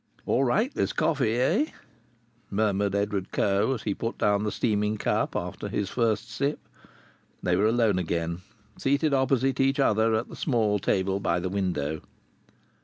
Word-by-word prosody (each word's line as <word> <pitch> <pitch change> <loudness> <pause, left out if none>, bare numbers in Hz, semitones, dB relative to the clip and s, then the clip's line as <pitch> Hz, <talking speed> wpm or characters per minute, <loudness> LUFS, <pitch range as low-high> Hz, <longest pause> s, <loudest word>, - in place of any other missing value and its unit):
"All 135 - +2
right, 220 - +1
this - - -1
coffee, 130 -8 +1
eh?" 185 - +3 0.8
murmured 100 -1 0
Edward 100 -1 -1
Coe 100 +6 +1
as 115 - -8
he 105 - 0
put 115 +4 -4
down 100 -1 +2
the 105 0 -1
steaming 105 -1 0
cup - - 0
after - - -4
his 100 -2 -2
first 115 -2 0
sip. 140 +5 -1 0.9
They 90 - +2
were 100 +4 +3
alone 110 -4 +2
again, 85 0 -2 0.4
seated 140 +2 +1
opposite 135 0 +2
each 135 +1 +2
other 110 -3 +3
at 110 +2 -1
the - - -10
small 110 -7 +1
table 95 +1 0
by 85 -2 0
the 90 +1 -3
window. 85 -6 -2
105 Hz, 160 wpm, -27 LUFS, 100-130 Hz, 0.9 s, eh